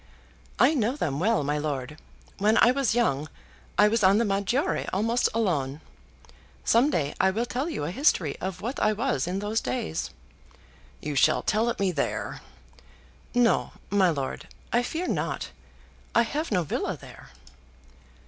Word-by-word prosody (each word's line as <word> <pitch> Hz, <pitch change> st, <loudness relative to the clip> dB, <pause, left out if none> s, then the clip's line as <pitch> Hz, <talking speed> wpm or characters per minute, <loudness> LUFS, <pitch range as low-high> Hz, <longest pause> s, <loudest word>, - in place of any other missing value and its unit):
"I -, -, +5 dB
know 245 Hz, -2 st, +1 dB
them 145 Hz, -, -2 dB
well, 215 Hz, -1 st, +2 dB
my 145 Hz, +1 st, -1 dB
lord. 145 Hz, -1 st, -4 dB, 0.4 s
When 215 Hz, +3 st, +3 dB
I 240 Hz, -, +6 dB
was 260 Hz, -4 st, +1 dB
young 155 Hz, -, +1 dB, 0.5 s
I 210 Hz, -, +7 dB
was 220 Hz, 0 st, +1 dB
on 190 Hz, +2 st, +6 dB
the 230 Hz, -, +2 dB
Maggiore 200 Hz, +7 st, 0 dB
almost 230 Hz, +5 st, +1 dB
alone. 155 Hz, -11 st, -1 dB, 0.9 s
Some 245 Hz, +6 st, +4 dB
day 150 Hz, -, -1 dB
I 190 Hz, -, +4 dB
will 220 Hz, +5 st, -1 dB
tell 260 Hz, +6 st, -2 dB
you 315 Hz, -, -3 dB
a 150 Hz, -, -2 dB
history 185 Hz, -, +2 dB
of 185 Hz, 0 st, -4 dB
what 240 Hz, +6 st, -3 dB
I 215 Hz, -, +3 dB
was 235 Hz, -2 st, -1 dB
in 180 Hz, +2 st, -2 dB
those 210 Hz, +3 st, -1 dB
days." 125 Hz, -10 st, -3 dB, 0.9 s
"You 150 Hz, -, -3 dB
shall 135 Hz, -, +3 dB
tell 220 Hz, +2 st, +1 dB
it 235 Hz, -, -3 dB
me 195 Hz, -2 st, +2 dB
there." 150 Hz, -5 st, -3 dB, 0.9 s
"No, 245 Hz, -2 st, +2 dB, 0.2 s
my 195 Hz, -3 st, +4 dB
lord, 140 Hz, -5 st, -3 dB, 0.3 s
I 240 Hz, -, +4 dB
fear 325 Hz, +8 st, -3 dB
not. -, -, -2 dB, 0.6 s
I 235 Hz, -, +6 dB
have 300 Hz, +7 st, -3 dB
no 180 Hz, -4 st, +2 dB
villa 150 Hz, -, -2 dB
there." -, -, -13 dB
205 Hz, 160 wpm, -26 LUFS, 155-235 Hz, 0.9 s, I